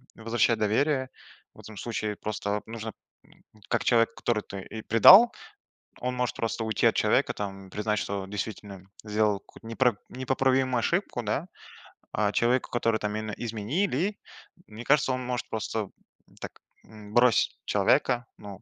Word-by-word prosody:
возвращать 115 0 +1
доверие. 130 +5 +1 0.4
В - - -19
этом 110 -1 -12
случае 110 -1 -3
просто 105 -1 -4
вот 105 0 -6
нужно, 110 -1 -6 0.8
как 115 - 0
человек, 115 -1 +3
который 110 -3 -1 0.3
и 110 - -6
предал, 190 - +8 0.7
он 125 0 -2
может 125 -1 -1
просто 115 0 -2
уйти 110 -2 +1
от - - +4
человека, - - +2
там, 95 -2 -6
признать, 105 +2 -1
что 100 -1 -4
действительно 100 -1 -6 0.2
сделал 105 -1 +1
какую-то - - -17
непр 120 -1 +1
непоправимую 130 0 +1
ошибку, 170 - -1
да? 125 - -2 0.7
А 105 0 +1
человеку, 120 +2 +1
которому 115 -2 +1
там 105 0 -3
именно 110 0 -4
изменили, 135 - -1 0.5
мне 110 +2 -9
кажется, 140 -2 +3
он 130 0 -3
может 125 -1 -3
просто 110 -2 -3 0.5
так, - - -8 0.3
м, 105 -1 -13
бросить 120 -1 +3
человека, 120 -1 +2
ну, 100 -1 -10
115 Hz, 145 wpm, -27 LUFS, 105-125 Hz, 0.8 s, предал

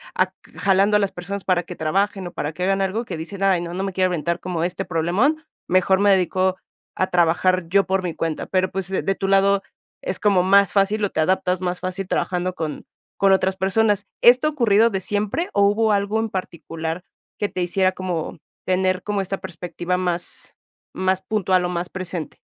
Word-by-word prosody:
ac 185 0 +1 0.2
jalando 200 +2 +3
a - - +1
las 200 -2 0
personas 195 +2 -5
para 180 -2 +2
que 175 +1 -9
trabajen, 195 +5 -1
o 175 - -6
para 150 - -3
que 170 +3 -5
hagan 195 +1 +1
algo, 205 +5 -1
que 180 - -5
dicen, 175 +5 -6
ay, 190 -3 +3
no 170 0 -5
no 190 - -2
me 195 -1 -3
quiero 185 0 +2
aventar 170 0 -1
como 175 -2 -3
este 180 +2 -2
problemón, 195 - +1 0.2
mejor 185 +1 +3
me 205 0 +4
dedico 185 0 +2 0.4
a 185 - +1
trabajar 175 +1 +2
yo 195 +2 +3
por 190 0 0
mi 175 - -2
cuenta. 160 -1 -3
Pero, 185 0 0
pues, 190 -1 -3
de 190 - -1
de 195 0 0
tu 195 - -3
lado 195 0 +3 0.4
es 185 - -2
como 200 -4 +3
más 195 0 +4
fácil, 205 +1 +2
o 200 - -2
te 160 - -1
adaptas 180 +1 +1
más 180 -1 -2
fácil 185 +1 -4
trabajando 180 0 -1
con 160 -4 -5 0.3
con 195 0 +4
otras 190 0 +2
personas, 205 +2 +1 0.2
¿esto 245 +5 +6
ha 305 - +1
ocurrido 230 -5 +4
de 195 -4 -2
siempre, 210 - -1
o 200 - +2
hubo 220 +2 +2
algo 200 +2 0
en 225 0 -1
particular 165 -2 -5 0.4
que 205 - +1
te 185 - -4
hiciera 185 +1 +1
como 180 -4 -4 0.3
tener 185 0 +1
como 205 -1 -1
esta 195 0 -4
perspectiva 180 0 -4
más 180 -1 -3 0.4
más 185 0 0
puntual, 190 -4 +1
o - - -1
más 175 0 -3
presente? 180 -3 -5
185 Hz, 205 wpm, -22 LUFS, 180-200 Hz, 0.4 s, esto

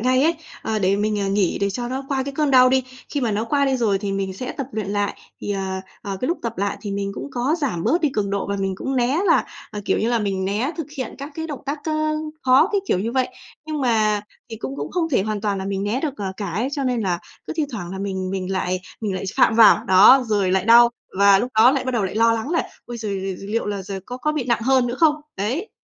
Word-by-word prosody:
ngay 255 +3 +3
ấy, 325 +3 +3 0.3
ờ, 220 -1 -1
để 195 0 +2
mình, 210 0 0
à, 200 - 0
nghỉ 195 -2 +1
để 200 0 +1
cho 240 +4 -4
nó 265 +2 -4
qua 270 -2 0
cái 280 +1 -5
cơn 300 0 +1
đau 255 -1 +7
đi. 260 0 +2 0.2
Khi 290 - -2
mà 240 -4 0
nó 210 +2 -1
qua 280 +4 +1
đi 270 -1 +1
rồi 215 -6 +1
thì 200 -1 -3
mình 195 -1 -2
sẽ 250 +7 -5
tập 275 - -5
luyện 215 -3 -3
lại, 205 0 -1 0.2
thì, - - -4
ờ, 190 -1 -3 0.2
ờ, 200 -1 -4
cái 255 - -1
lúc 345 - 0
tập 230 -3 -4
lại 200 +1 -1
thì 205 - -5
mình 200 0 -2
cũng 285 - -6
có 255 +4 0
giảm 210 - -1
bớt 315 +10 +2
đi 310 - +3
cường 205 -6 -1
độ 200 0 -1
và 200 0 -2
mình 195 -1 -1
cũng 270 +6 -3
né 255 +5 +2
là, - - +4 0.3
ờ, 210 - -5
kiểu - - +1
như 225 - 0
là, 235 -1 +2
mình 195 -3 -1
né 210 +8 0
thực 325 -4 -4
hiện 260 -4 -4
các 280 +2 -6
cái 320 +1 -4
động 290 -4 -6
tác 285 +2 -2
k - - -11 0.6
khó 265 +7 +5
cái 405 - +2
kiểu - - +1
như 225 +5 -2
vậy. 260 -1 +1 0.4
Nhưng 310 -2 -3
mà 215 -4 +2 0.3
thì 225 - -5
cũng 265 +5 -6
cũng - - -4
không 345 -3 0
thể 255 -10 +2
hoàn 210 0 -2
toàn 205 -1 -1
là 190 - -4
mình 195 0 -2
né 220 +6 -1
được, 295 -3 -2
ờ, 195 -2 -4
cả 205 - -4
ấy, 225 +9 -1
cho 280 -1 -2
nên 250 -2 0
là 180 -4 0 0.3
cứ - - -4
thi 310 - +1
thoảng 195 -7 -6
là 190 - -5
mình 190 -2 -3
mình 190 -1 -3
lại 185 -1 -1 0.2
mình 210 -4 -2
lại 185 - -4
phạm 250 - +4
vào. 220 0 +7
Đó, 205 +6 +7
rồi 205 -4 +1
lại 190 - +2
đau 235 +1 +8 0.3
và 200 -1 +7
lúc 245 +4 -2
đó 230 +3 +7
lại 270 -1 -1
bắt 260 - -1
đầu 235 -5 0
lại 190 - -3
lo 230 +1 +4
lắng 230 +5 -3
là 335 - 0 0.2
"Ôi 240 - -7
giờ 220 -2 -5
giờ 195 -1 -4
liệu 230 +2 -1
là 205 -2 -3
giờ 195 0 -6
có 250 - -5
có 300 +4 -1
bị 300 -4 -2
nặng 235 -1 +1
hơn 260 0 +3
nữa 240 - -2
không?" 315 -3 +5 0.2
Đấy. 255 - -2
225 Hz, 290 wpm, -22 LUFS, 200-260 Hz, 0.6 s, đau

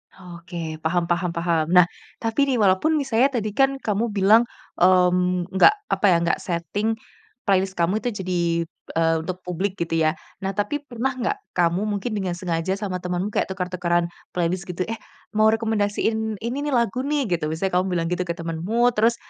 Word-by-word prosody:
Oke, 170 -3 -7
paham 175 +2 +1
paham 175 0 0
paham. 170 -2 +1
Nah, 180 -1 +8 0.4
tapi 230 +5 +1
nih 260 -2 +1
walaupun 205 +9 +3
misalnya 265 -4 +3
tadi 215 -2 -2
kan 270 +5 +2
kamu 220 -2 -1
bilang, 210 +3 +4 0.3
mmm, 180 0 +3
nggak 190 - +7 0.2
apa - - +1
ya, 180 - +6
nggak 170 - +1
setting 175 +4 -2 0.6
playlist 190 -1 +1
kamu 185 +7 +1
itu 245 - +1
jadi, 180 -1 -1 0.6
eee, 165 0 +3
untuk 180 +2 -5
publik 185 +2 -3
gitu 165 -1 -1
ya. 155 - +4 0.3
Nah 195 - 0
tapi 275 +9 -2
pernah 255 0 -3
nggak 255 +12 -1 0.2
kamu 175 +3 +2
mungkin 205 +2 -2
dengan 190 -4 -2
sengaja 175 +1 -1
sama 195 -3 -3
temanmu 180 +3 -2
kayak - - 0
tuker-tukeran 180 -2 -1 0.2
playlist 175 +2 -1
gitu, 180 +1 -2
"Eh, 225 +2 -5 0.3
mau 215 0 +4
rekomendasiin 220 0 0
ini 240 +3 -2
nih 285 - +1
lagu 240 +3 0
nih," 295 -1 +1
gitu. 165 -3 0
Misalnya 180 +3 0
kamu 185 - 0
bilang 175 -3 -1
gitu 180 0 -1
ke 170 - -2
temanmu 175 +9 0
terus, 230 +1 +2
190 Hz, 175 wpm, -23 LUFS, 175-220 Hz, 0.6 s, Nah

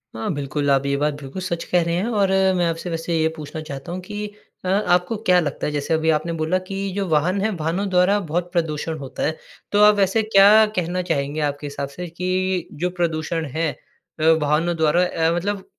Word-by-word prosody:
हाँ, 115 - -2
बिल्कुल, 145 0 -2
आप 135 0 +2
ये 140 0 +1
बात 150 +1 0
बिल्कुल 140 +7 -7
सच 175 -2 -3
कह 180 - +2
रहे 170 0 -1
हैं 180 +4 0
और 205 -5 +1 0.3
मैं 175 -1 +1
आपसे 165 +2 -4
वैसे 165 0 -3
ये 160 0 +2
पूछना 155 0 -7
चाहता 140 0 -7
हूँ 180 - -4
कि 210 +1 -5 0.4
अ, - - -2
आपको 180 0 +2
क्या 185 -4 +3
लगता 150 -4 -2
है? - - -2
जैसे 145 +2 -1
अभी 160 0 +1
आपने 165 +3 -2
बोला 160 +4 +1
कि 195 0 -3
जो 200 -1 -1
वाहन 165 +5 +2
है, 215 - +1
वाहनों 170 +6 -1
द्वारा 185 +2 +3
बहुत 175 +1 -1
प्रदूषण 160 -2 -1
होता 135 -3 -6
है। 160 +1 -1 0.3
तो 205 - +3
आप 210 0 +7
वैसे 200 +2 +2
क्या 215 +1 +7
कहना 180 0 -1
चाहेंगे 145 -3 -2
आपके 145 0 -2
हिसाब 140 0 -4
से 175 +6 -7
कि 185 +1 -1 0.2
जो 180 - +2
प्रदूषण 165 -1 -1
है 160 -1 0 0.5
अ, - - -2 0.2
वाहनों 155 +4 +1
द्वारा 160 +3 +3
अ, 165 -2 0
मतलब 195 +2 -2
170 Hz, 215 wpm, -22 LUFS, 155-185 Hz, 0.5 s, आप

